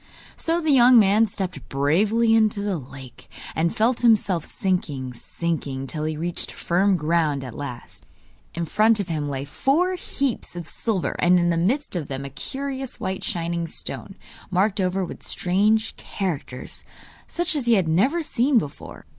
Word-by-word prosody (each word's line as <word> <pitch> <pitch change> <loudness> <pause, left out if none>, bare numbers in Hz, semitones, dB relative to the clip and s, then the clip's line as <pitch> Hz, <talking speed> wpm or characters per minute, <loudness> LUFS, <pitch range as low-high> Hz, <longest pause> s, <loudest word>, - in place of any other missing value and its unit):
So 330 +1 0
the 315 -3 +1
young 250 -2 +7
man 215 +1 +5
stepped 190 -7 -5
bravely 205 +12 +2
into 215 -2 +3
the 200 -5 -1
lake, 130 -2 -12 0.3
and 165 +1 +1
felt 230 +3 +2
himself 210 -8 +3
sinking, 145 -9 -2
sinking, 140 -1 -3
till 155 +3 -3
he 155 -1 -2
reached 170 +2 -3
firm 190 +2 +1
ground 155 -3 +1
at 125 -3 -7
last. 125 -3 -8 0.5
In 170 0 -2
front 215 +6 +3
of 195 -3 -3
him 150 -3 -2
lay 135 0 -3
four 300 - +1
heaps 275 - -3
of 170 -2 -6
silver, 215 -6 -2
and 180 +1 +5
in 175 0 +2
the - - +1
midst 210 - 0
of 165 -5 -2
them 135 0 -5
a 140 - -7
curious 270 - -5
white 190 0 -3
shining 170 -3 -2
stone, - - -6 0.3
marked 195 +2 +1
over 185 +1 0
with - - -9
strange 210 +5 +1
characters, 160 -10 -5 0.4
such 345 -1 -1
as 270 -5 -1
he 235 - +6
had 185 -5 +2
never 260 - +2
seen 265 -1 +2
before. 145 -10 -4
185 Hz, 165 wpm, -24 LUFS, 155-225 Hz, 0.5 s, young